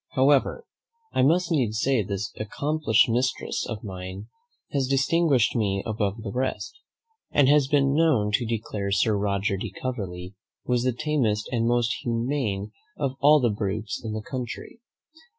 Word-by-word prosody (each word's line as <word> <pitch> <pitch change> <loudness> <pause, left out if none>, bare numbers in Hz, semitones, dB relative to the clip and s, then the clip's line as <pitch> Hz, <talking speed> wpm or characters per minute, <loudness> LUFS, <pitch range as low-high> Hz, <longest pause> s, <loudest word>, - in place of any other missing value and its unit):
"However, 140 - +3 0.5
I - - +2
must 170 +6 +3
needs 120 -9 +1
say 130 -3 +2
this 100 0 -4
accomplished 130 +2 +1
mistress 125 +2 -1
of 110 -2 -5
mine 95 +1 -7 0.4
has 135 -2 0
distinguished 135 -1 +2
me 100 -4 0
above 110 0 -2
the 100 - -4
rest, 130 - -2 0.6
and 145 -2 +4
has 145 -1 +4
been 140 -1 +3
known 145 -10 +3
to 120 +3 +2
declare 105 -3 -3
Sir 105 +2 +2
Roger 100 -1 0
de 110 +3 -4
Coverley 95 -5 -5 0.3
was 125 -1 +1
the 130 +1 +1
tamest 120 -6 0
and 115 -2 +1
most 120 -1 +2
humane 115 -4 -2 0.3
of 140 -3 0
all 150 +2 +6
the 120 -4 +2
brutes 105 0 -3
in 110 -2 -4
the 110 0 -4
country. 125 - -6
115 Hz, 150 wpm, -25 LUFS, 105-135 Hz, 0.6 s, all